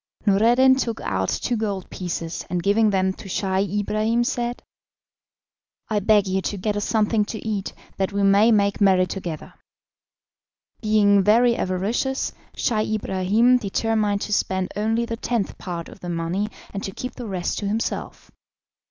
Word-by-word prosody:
Noureddin 235 Hz, +6 st, +5 dB
took 230 Hz, -4 st, -2 dB
out 95 Hz, 0 st, -1 dB
two 245 Hz, -, -1 dB
gold 205 Hz, -4 st, -3 dB
pieces, 170 Hz, -2 st, -4 dB
and 175 Hz, -1 st, -2 dB
giving 215 Hz, +2 st, +3 dB
them 190 Hz, -1 st, +1 dB
to 195 Hz, -, -11 dB
Scheih 190 Hz, +1 st, 0 dB
Ibrahim 215 Hz, +3 st, +1 dB
said, 240 Hz, 0 st, -2 dB, 1.3 s
"I 215 Hz, -2 st, +1 dB
beg 205 Hz, 0 st, +4 dB
you 190 Hz, 0 st, 0 dB
to 205 Hz, -, -3 dB
get 205 Hz, +2 st, -1 dB
us 205 Hz, -, -1 dB
something 215 Hz, -1 st, +2 dB
to 220 Hz, +1 st, -6 dB
eat 205 Hz, -3 st, -2 dB, 0.2 s
that 190 Hz, 0 st, 0 dB
we 200 Hz, 0 st, 0 dB
may 200 Hz, +3 st, +5 dB
make 200 Hz, -1 st, +2 dB
merry 190 Hz, -2 st, +5 dB
together." 175 Hz, -4 st, -6 dB, 1.3 s
Being 210 Hz, -2 st, +4 dB
very 235 Hz, +4 st, +4 dB
avaricious, 215 Hz, +9 st, -1 dB, 0.2 s
Scheih 220 Hz, -2 st, 0 dB
Ibrahim 215 Hz, +5 st, +2 dB
determined 210 Hz, -1 st, 0 dB
to 210 Hz, -, -2 dB
spend 190 Hz, -2 st, -1 dB
only 225 Hz, +3 st, 0 dB
the 230 Hz, 0 st, -4 dB
tenth 230 Hz, -3 st, -2 dB
part 170 Hz, -3 st, -5 dB
of -, -, -13 dB
the 175 Hz, -, -7 dB
money 175 Hz, +5 st, -2 dB, 0.2 s
and 195 Hz, -, -4 dB
to 195 Hz, -, -4 dB
keep 255 Hz, +6 st, -6 dB
the 245 Hz, -3 st, -7 dB
rest 185 Hz, -3 st, -2 dB
to 205 Hz, -, -3 dB
himself. 220 Hz, +3 st, -3 dB
205 Hz, 160 wpm, -23 LUFS, 190-225 Hz, 1.3 s, Noureddin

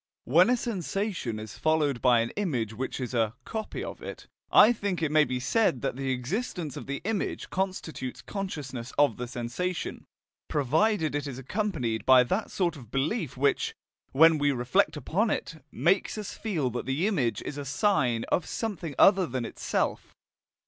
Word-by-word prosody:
When 170 Hz, -, +5 dB
a 250 Hz, -, +3 dB
sensation 195 Hz, -, -2 dB
is 110 Hz, -1 st, -9 dB
followed 150 Hz, -5 st, +1 dB
by 120 Hz, -2 st, +5 dB
an 115 Hz, -, -2 dB
image 125 Hz, -, -2 dB
which 130 Hz, +5 st, -4 dB
is 125 Hz, -1 st, -4 dB
a 115 Hz, -2 st, +1 dB
"copy" 220 Hz, -1 st, -4 dB
of -, -, -7 dB
it, -, -, -8 dB, 0.3 s
I 230 Hz, -, +8 dB
think 200 Hz, -5 st, -2 dB
it 155 Hz, -, +1 dB
may 155 Hz, 0 st, +5 dB
be 125 Hz, -2 st, -2 dB
said 135 Hz, -, +1 dB
that -, -, -1 dB
the 135 Hz, 0 st, -3 dB
existence 150 Hz, -, -3 dB
of -, -, -7 dB
the 140 Hz, +1 st, -3 dB
image 210 Hz, 0 st, -2 dB
constitutes 185 Hz, -9 st, -3 dB
consciousness 140 Hz, -, -5 dB
of 145 Hz, 0 st, +4 dB
the 125 Hz, -1 st, -4 dB
sensation, 125 Hz, +10 st, -4 dB, 0.4 s
provided 155 Hz, -, +1 dB
it 145 Hz, 0 st, -2 dB
is 130 Hz, -3 st, -6 dB
accompanied 135 Hz, -, -2 dB
by 130 Hz, -1 st, +8 dB
that 185 Hz, -, -1 dB
sort 175 Hz, -4 st, 0 dB
of 125 Hz, -7 st, -12 dB
belief 140 Hz, -, -1 dB
which, 140 Hz, +2 st, +1 dB, 0.4 s
when 160 Hz, +2 st, +6 dB
we 145 Hz, 0 st, +3 dB
reflect 125 Hz, +3 st, +1 dB
upon 200 Hz, +9 st, 0 dB
it, 160 Hz, -7 st, -3 dB
makes 175 Hz, -, +1 dB
us 210 Hz, -2 st, -5 dB
feel 160 Hz, -, -1 dB
that 120 Hz, +1 st, -4 dB
the 135 Hz, +7 st, 0 dB
image 130 Hz, -, 0 dB
is 145 Hz, -, -5 dB
a -, -, -4 dB
"sign" 135 Hz, -, +1 dB
of 175 Hz, -, +1 dB
something 185 Hz, -10 st, -4 dB
other 195 Hz, -3 st, +6 dB
than 125 Hz, -1 st, -3 dB
itself. -, -, -2 dB
145 Hz, 175 wpm, -28 LUFS, 125-190 Hz, 0.4 s, I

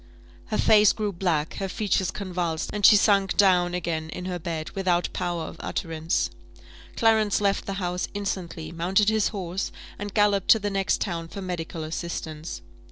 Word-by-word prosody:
Her 215 Hz, -, -1 dB
face 210 Hz, -1 st, +6 dB
grew 210 Hz, -2 st, -2 dB
black, 170 Hz, -4 st, -1 dB
her 195 Hz, -1 st, -3 dB
features 190 Hz, -2 st, 0 dB
convulsed, 175 Hz, -5 st, -3 dB
and 210 Hz, -1 st, -3 dB
she 210 Hz, -, +9 dB
sunk 200 Hz, -2 st, +3 dB
down 180 Hz, -3 st, +4 dB
again 160 Hz, -2 st, -3 dB
in 180 Hz, -, -6 dB
her 180 Hz, -1 st, -3 dB
bed, 160 Hz, -1 st, -4 dB
without 180 Hz, -2 st, 0 dB
power 175 Hz, -2 st, -2 dB
of 160 Hz, -, -8 dB
utterance. 165 Hz, 0 st, -2 dB, 0.7 s
Clarence 220 Hz, -3 st, +3 dB
left 200 Hz, -1 st, 0 dB
the 195 Hz, -, -2 dB
house 180 Hz, -2 st, -2 dB
instantly, 175 Hz, -5 st, -4 dB
mounted 185 Hz, +5 st, +2 dB
his 220 Hz, -1 st, +2 dB
horse, 190 Hz, -3 st, -3 dB, 0.3 s
and 205 Hz, 0 st, -4 dB
galloped 205 Hz, -2 st, +2 dB
to -, -, +7 dB
the 205 Hz, 0 st, -2 dB
next 195 Hz, -1 st, 0 dB
town 170 Hz, -4 st, -2 dB
for 200 Hz, -, -8 dB
medical 170 Hz, -3 st, -4 dB
assistance. 155 Hz, -, -5 dB
180 Hz, 165 wpm, -25 LUFS, 170-200 Hz, 0.7 s, she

